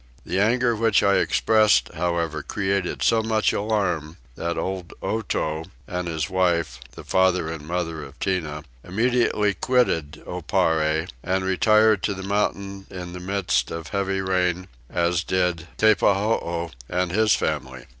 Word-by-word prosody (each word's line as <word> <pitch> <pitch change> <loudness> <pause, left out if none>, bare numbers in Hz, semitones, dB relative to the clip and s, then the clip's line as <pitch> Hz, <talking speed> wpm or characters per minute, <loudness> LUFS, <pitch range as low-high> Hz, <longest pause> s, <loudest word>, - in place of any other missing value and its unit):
The 95 - -1
anger 120 +3 +2
which 110 -2 +3
I 100 -1 +4
expressed 105 - +3
however 85 -2 -1
created 95 +1 -2
so 115 -1 +4
much 110 -1 +1
alarm 100 -7 -1 0.2
that 85 +1 -3
old 95 -2 -4
Otow 80 -7 -2 0.2
and 90 -2 -4
his 80 -2 -2
wife 90 -3 0
(the - - -10
father 95 -3 +2
and 75 -2 -7
mother 85 -2 -2
of 70 +1 -12
Tinah) 80 -6 -2 0.2
immediately 110 0 +1
quitted 85 - +1
Oparre, 80 -2 0
and 95 +3 -1
retired 110 +2 +4
to 100 0 -1
the 95 - -7
mountains 100 -1 -2
in 90 -1 -7
the 90 - -6
midst 95 0 0
of 80 -1 -6
heavy 95 -1 -1
rain, 90 -1 0 0.2
as 85 0 +1
did 90 -3 0
Teppahoo 100 -5 +2 0.2
and 90 0 0
his 110 +2 +3
family. 65 -1 -3
90 Hz, 140 wpm, -24 LUFS, 85-100 Hz, 0.2 s, I